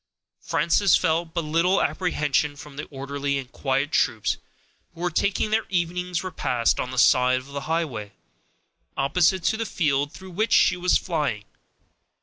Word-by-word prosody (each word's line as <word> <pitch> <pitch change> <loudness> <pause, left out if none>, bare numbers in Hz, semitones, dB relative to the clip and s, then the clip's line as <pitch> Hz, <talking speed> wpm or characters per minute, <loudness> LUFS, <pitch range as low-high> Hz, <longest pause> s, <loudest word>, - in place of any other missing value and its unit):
Frances 185 +2 +3
felt 165 +1 0
but 170 - 0
little 165 +5 +2
apprehension 150 -6 0
from 145 0 -12
the 145 - -5
orderly 140 0 -3
and 130 -1 -7
quiet 135 +2 -1
troops 110 -9 +1 0.6
who 170 - -10
were 180 0 0
taking 200 +5 0
their 220 +1 +1
evening's 180 0 -1
repast 125 -10 0
on 125 - -2
the 130 - -6
side 125 +1 +4
of 130 - -6
the 140 - -3
highway, 135 -12 -2 0.9
opposite 170 +6 +2
to 220 - +1
the 225 - -1
field 145 -5 0
through 190 0 -11
which 215 +6 0
she - - +5
was 180 0 +2
flying. 150 - -2
155 Hz, 155 wpm, -24 LUFS, 135-180 Hz, 0.9 s, she